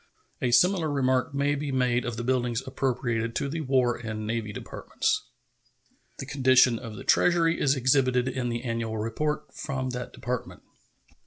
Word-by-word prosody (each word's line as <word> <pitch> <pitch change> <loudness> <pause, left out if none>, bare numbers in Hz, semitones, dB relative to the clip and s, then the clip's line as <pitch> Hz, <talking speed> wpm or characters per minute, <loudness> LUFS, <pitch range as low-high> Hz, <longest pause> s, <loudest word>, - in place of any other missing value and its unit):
A 125 - +1
similar 175 +5 +4
remark 130 -2 +1
may 140 +1 +1
be 145 0 -3
made 125 -2 +1
of 120 -1 -4
the 120 - -3
buildings 125 -1 0
appropriated 120 -4 -1
to - - -1
the 160 +3 -3
War 130 -4 +2
and 110 -2 -5
Navy 110 -1 -2
Departments. 425 - -3 0.9
The 135 - -6
condition 130 -3 +4
of 115 -4 -8
the - - -8
Treasury 170 -1 +3
is 140 0 +3
exhibited 130 -1 +2
in 130 -2 -2
the 120 0 -3
annual 115 -2 -2
report 130 +8 -2
from 130 -3 -3
that 125 0 -5
Department. 125 0 -5
130 Hz, 160 wpm, -27 LUFS, 120-140 Hz, 0.9 s, similar